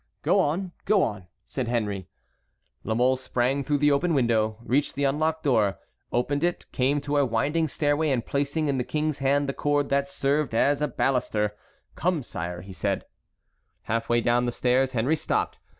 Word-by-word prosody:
"Go - - +3
on, 175 +5 0
go 205 -2 +4
on," 100 -4 -3 0.2
said 130 -3 -3
Henry. 105 -6 -2 0.8
La 110 - -1
Mole 125 +2 +3
sprang 130 +2 0
through 145 +1 +1
the 145 +1 +3
open 160 +4 +2
window, 110 -4 +2
reached 140 +5 0
the 140 - -1
unlocked 155 +3 0
door, 110 - +2 0.3
opened 145 +5 0
it, 175 0 0
came 135 +3 +1
to 145 +1 -1
a 145 - +4
winding 140 +7 +1
stairway, 150 +2 +1
and 125 -4 0
placing 145 +2 -1
in 135 -2 0
the - - 0
king's 150 +1 -2
hand 140 +1 +2
the 135 - -1
cord 145 0 0
that 140 0 +1
served 140 -1 0
as 140 +5 +2
a 150 - +2
baluster: 110 -6 0 0.4
"Come, 175 -5 0
sire," 90 -4 -5
said - - -1
he. - - -34 0.7
Half 115 +1 -2
way 120 0 +3
down 120 +1 +2
the 120 - 0
stairs 130 +2 +1
Henry 125 +6 +2
stopped. - - -1
135 Hz, 180 wpm, -26 LUFS, 120-145 Hz, 0.8 s, go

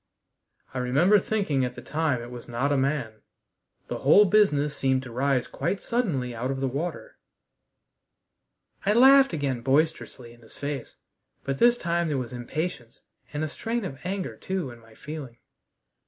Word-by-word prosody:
I 130 - -2
remember 150 +12 +4
thinking 185 -10 0
at 125 0 -3
the - - -8
time 150 -6 -1
it 120 - -9
was 120 -1 -9
not 125 +5 0
a - - +3
man. 135 -5 -1 0.7
The - - -4
whole 175 +10 +6
business 150 -8 +3
seemed 130 -1 +1
to 125 - -9
rise 130 +1 +1
quite 170 +7 -2
suddenly 165 - -1
out 120 +3 -3
of 135 0 -2
the 135 - 0
water." 165 - -5 1.6
I 205 - +3
laughed 270 +3 +7
again 140 -7 -2
boisterously 135 -3 0
in 120 - -20
his 110 - -15
face, 140 -4 -5 0.5
but 135 0 -3
this 240 0 +5
time 170 -2 0
there 150 -3 -1
was 125 -1 -4
impatience 125 0 -5 0.3
and 150 +1 -3
a - - 0
strain 230 +7 -3
of 135 -6 -6
anger 190 +1 -3
too, 185 -8 -3
in 120 - -13
my 115 -1 -19
feeling. 145 -5 -8
140 Hz, 170 wpm, -26 LUFS, 125-180 Hz, 1.6 s, laughed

